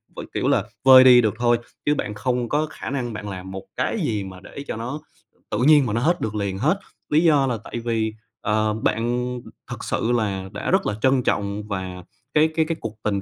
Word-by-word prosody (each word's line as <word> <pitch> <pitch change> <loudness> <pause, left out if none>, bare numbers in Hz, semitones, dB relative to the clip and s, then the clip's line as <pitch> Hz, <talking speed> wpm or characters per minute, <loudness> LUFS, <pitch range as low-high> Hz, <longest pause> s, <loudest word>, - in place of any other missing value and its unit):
v - - -8
kiểu - - -1
là, - - +3 0.2
vơi 130 -1 +10
đi 125 -1 +8
được 110 -4 +1
thôi, 120 0 +3 0.3
chứ 150 - +3
bạn 105 - -3
không 125 +2 -1
có 155 +1 +1
khả - - -7
năng 125 -4 -3
bạn 105 -1 -6
làm 95 -1 -7
một 95 0 -6
cái 225 - -1
gì 110 - -1
mà 95 -1 -9
để 120 +8 -9
cho - - -3
nó 125 +7 -5 0.5
tự 105 - 0
nhiên 150 -3 +6
mà 105 - -2
nó 115 - 0
hết 175 +7 +1
được 110 -1 -2
liền 100 -2 -2
hết. 155 - +1 0.3
Lý 155 +3 +3
do 145 -5 +4
là 120 -3 -1
tại 120 - -5
vì, 115 -2 -1 0.3
ờ, 110 0 +1
bạn 120 +3 -1 0.4
thực - - -6
sự 120 - -1
là 100 -5 -1
đã 100 - -3
rất 190 +1 +3
là 105 - 0
trân 130 -1 +3
trọng 100 -1 -1
và 95 -2 -5 0.3
cái 155 +1 +4
cái 160 - +3
cái 165 +1 -2
cuộc 110 -1 -6
tình 100 -2 0
115 Hz, 230 wpm, -23 LUFS, 105-135 Hz, 0.5 s, vơi